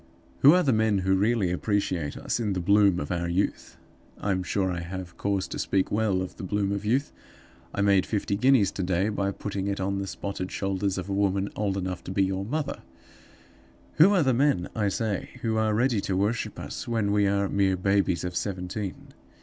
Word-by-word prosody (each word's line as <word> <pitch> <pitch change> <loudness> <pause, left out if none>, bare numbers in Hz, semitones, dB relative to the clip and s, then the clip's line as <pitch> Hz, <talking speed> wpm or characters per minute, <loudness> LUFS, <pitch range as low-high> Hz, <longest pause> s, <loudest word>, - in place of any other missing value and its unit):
Who 145 +5 +8
are 180 - +3
the 135 - +3
men 110 -2 +2
who 95 0 +3
really 105 -2 +1
appreciate 90 -5 -1
us - - -2
in 105 -4 -1
the 95 - -2
bloom 100 0 +4
of 75 - -4
our 85 -1 -1
youth 90 +4 -2 0.4
(I'm 95 -2 0
sure 95 +1 -1
I 90 - -3
have 90 0 -7
cause 100 +1 -1
to - - -5
speak 95 -1 0
well 105 -3 +1
of 95 - -9
the - - -7
bloom 100 +1 -1
of 100 0 -2
youth; 130 +7 0 0.6
I - - -2
made 100 -2 +3
fifty 100 -2 -1
guineas 120 -3 +4
to - - -4
day 95 +2 +1
by 100 -2 -1
putting 100 0 -4
it 100 0 -2
on 100 +1 -1
the 100 - -4
spotted 95 -1 -5
shoulders 95 0 -1
of 90 0 -4
a 100 - -3
woman 100 0 +1
old 100 -2 -1
enough 95 -1 -4
to - - -5
be 95 +1 +2
your 95 0 -2
mother) 145 +6 -3 1.2
who 175 +6 +7
are 175 - +4
the 130 -2 +2
men, 130 -8 +2
I 105 -2 +1
say, 105 +3 -3
who 110 -1 0
are 110 -1 +1
ready 120 -2 +2
to 95 -1 -1
worship 105 +4 -1
us - - -6
when 110 -4 0
we 100 -1 +3
are 100 0 +1
mere 95 -1 +1
babies 95 -1 +1
of 90 0 -4
seventeen? 95 +1 -4
100 Hz, 210 wpm, -26 LUFS, 95-105 Hz, 1.2 s, Who